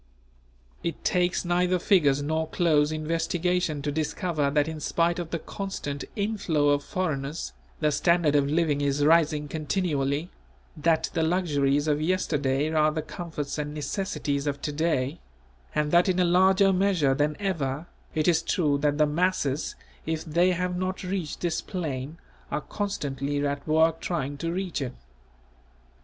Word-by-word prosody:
It 170 - -4
takes 180 0 +1
neither 180 +1 +2
figures 145 -7 +3
nor 160 +2 -1
close 155 -4 +2
investigation 165 0 -1
to 145 - -1
discover 155 0 -1
that 145 +1 +2
in 160 -1 -5
spite 170 +3 +1
of 170 -2 -4
the 170 - -1
constant 160 -7 -5
inflow 200 -9 +1
of 145 0 +2
foreigners, 155 -5 -3 0.3
the 150 -1 +3
standard 170 -1 +3
of 140 -1 +3
living 155 -2 +1
is 145 0 +1
rising 155 -2 +3
continually; 150 0 -1 0.4
that 160 0 +1
the 165 - 0
luxuries 150 -4 +1
of 150 0 +1
yesterday 150 -4 0
are 155 -1 +4
the 155 0 -3
comforts 155 -5 -5
and 150 0 -4
necessities 150 -3 -2
of 140 -1 -1
to 150 - -1
day; 155 -1 0 0.6
and 150 -1 +1
that 175 +2 +5
in 185 - +1
a 180 - +4
larger 190 +2 +4
measure 180 -7 +2
than 150 +2 +1
ever, 155 -7 -2 0.3
it 155 +1 +1
is 165 -2 +4
true 150 -4 +1
that 145 0 +1
the 155 - +5
masses, 150 -3 0 0.3
if 160 0 -2
they 175 +3 +3
have 180 +1 -1
not 185 +1 -3
reached 185 -4 -3
this 170 -2 0
plane, 155 -5 -4 0.3
are - - -2
constantly 145 -7 -2
at 140 +1 -3
work 160 +1 +3
trying 145 -5 -2
to 165 +4 -3
reach 180 -3 -2
it. 130 -2 -3
155 Hz, 155 wpm, -26 LUFS, 145-175 Hz, 0.6 s, that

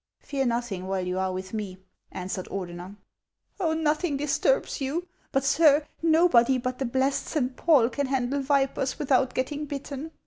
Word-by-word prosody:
" - - -64
Fear 270 -2 -2
nothing 235 -6 -2
while 190 -1 -1
you 180 +1 -2
are 190 0 0
with 185 +1 -6
me," 205 -4 -4 0.3
answered 185 0 -5
Ordener. 180 0 -6 0.3
" - - -18
Oil, 320 -3 +1
nothing 310 -1 0
disturbs 295 - 0
you; 315 +7 -2 0.2
but, 270 - +1
sir, 295 +1 +4 0.2
nobody 315 -6 +4
but 255 0 -3
the 270 - -1
blessed 265 +3 0
Saint 260 -5 -1
Paul 290 -9 +4
can 265 +3 -2
handle 265 +1 0
vipers 270 -1 0
without 260 -3 +1
getting 290 +3 -2
bitten. 285 +1 -6
265 Hz, 170 wpm, -26 LUFS, 230-295 Hz, 0.3 s, sir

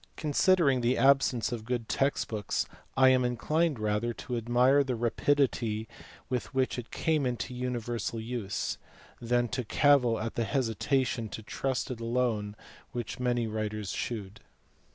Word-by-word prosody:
Considering 150 -3 +3
the 120 +2 +2
absence 135 -4 +3
of 115 -3 -4
good 120 -1 -3
text 135 +1 0
books 105 -3 -2 0.3
I 130 0 +7
am 130 -1 +4
inclined 150 +5 +1
rather 110 +2 -1
to 125 - -5
admire 125 +4 +3
the 130 -2 -2
rapidity 120 -2 +1 0.4
with 125 +2 -3
which 130 -1 +1
it 120 - -8
came 155 -3 0
into 125 +1 -3
universal 120 -2 -3
use, 110 -3 -3 0.4
than 120 +1 +1
to 125 +2 -2
cavil 125 -1 +3
at 115 +1 -3
the 120 - 0
hesitation 115 +1 0
to 110 - -7
trust 130 +4 -2
to - - -1
it 115 - -10
alone 115 -3 -1 0.4
which 120 -1 -4
many 120 -2 +1
writers 110 -2 -3
shewed. 105 -3 -4
120 Hz, 150 wpm, -29 LUFS, 115-130 Hz, 0.4 s, I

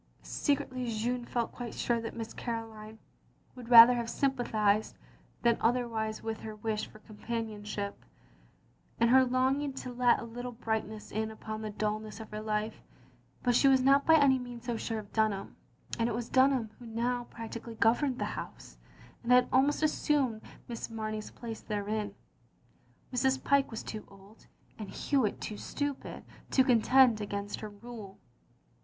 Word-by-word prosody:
Secretly 260 -4 -1
Jeanne 240 +2 -1
felt 235 -1 -2
quite 240 -2 -7
sure 235 -1 0
that 225 - -6
Miss 225 -1 -6
Caroline 220 -2 -6 0.6
would 245 -2 -10
rather 235 0 +11
have 235 -1 -2
sympathised 220 -7 +1 0.5
than 235 -1 +3
otherwise 225 -2 0
with 225 -1 -3
her 220 -1 -7
wish 215 0 -2
for - - -15
companionship, 215 -2 -5 1.0
and 235 +1 +4
her 260 0 +7
longing 260 +3 +1
to 255 -1 -6
let 245 -1 +4
a - - -6
little 245 +2 -6
brightness 220 -2 -3
in 220 +1 -1
upon 220 0 -6
the 215 - -4
dulness 215 +1 -3
of 220 - -9
her 215 0 -5
life; 215 0 -2 0.6
but 245 - +3
she 275 - +5
was 265 -1 +5
not 275 +2 +5
by 320 - +8
any 275 -4 +5
means 245 -1 -8
so 240 -1 -1
sure 225 0 -3
of 210 -1 -8
Dunham, 215 -3 0 0.4
and 230 +1 +2
it 215 - -2
was 235 0 -4
Dunham 260 -4 +3
who 240 - -10
now 240 +2 -1
prac 230 -1 -9
tically 230 -1 -8
governed 245 +3 +3
the - - -1
house, - - -8 0.4
and 235 - -2
had 250 0 +6
almost 280 +4 +3
as 310 - +3
sumed 260 -7 +1 0.3
Miss 235 -1 -5
Mamey's 215 -1 -4
place 230 -2 -7
therein. 210 -1 -3 1.0
Mrs. 265 +1 +1
Pyke 280 -1 +3
was 225 - -6
too 215 -1 -6
old, 195 +2 -18 0.3
and 210 -3 -6
Hewitt 265 -3 0
too 210 - -5
stupid, 285 +3 -4 0.3
to 260 - +4
contend 250 -1 +5
against 205 0 -4
her 215 - -6
rule. 205 -2 -10
230 Hz, 165 wpm, -31 LUFS, 215-250 Hz, 1.0 s, rather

